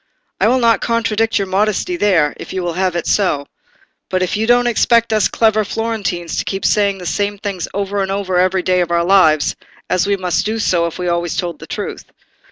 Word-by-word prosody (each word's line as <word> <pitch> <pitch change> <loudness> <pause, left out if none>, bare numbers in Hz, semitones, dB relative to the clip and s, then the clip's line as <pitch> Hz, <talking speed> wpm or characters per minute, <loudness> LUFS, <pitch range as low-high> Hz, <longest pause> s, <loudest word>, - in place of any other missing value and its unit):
"I - - +3
will 255 - +3
not 230 -4 +3
contradict 225 -1 0
your 200 - 0
modesty 210 - 0
there, 180 - +2
if - - -8
you 185 -1 -2
will 175 -1 -2
have 185 0 -1
it 170 - -2
so; 165 -8 +1 0.6
but 185 -1 0
you 220 +2 -1
don't 245 0 +4
expect 235 -1 +2
us 215 - +3
clever 220 -1 +2
Florentines 205 -6 -3
to - - 0
keep 195 0 -4
saying 200 -2 +2
the 180 - -9
same 205 +3 -1
things 200 -4 -4
over 200 0 -2
again 195 -1 -1
every 185 0 +1
day 180 0 +2
of 175 - -1
our 170 0 +1
lives, 165 -6 +3 0.4
as 185 +1 +1
we 200 0 +1
must 180 -2 -1
do 215 +1 -2
if 170 -6 0
we 180 - -3
always 170 -1 -1
told 170 -4 -3
the - - -11
truth. - - -5
195 Hz, 205 wpm, -17 LUFS, 180-215 Hz, 0.6 s, don't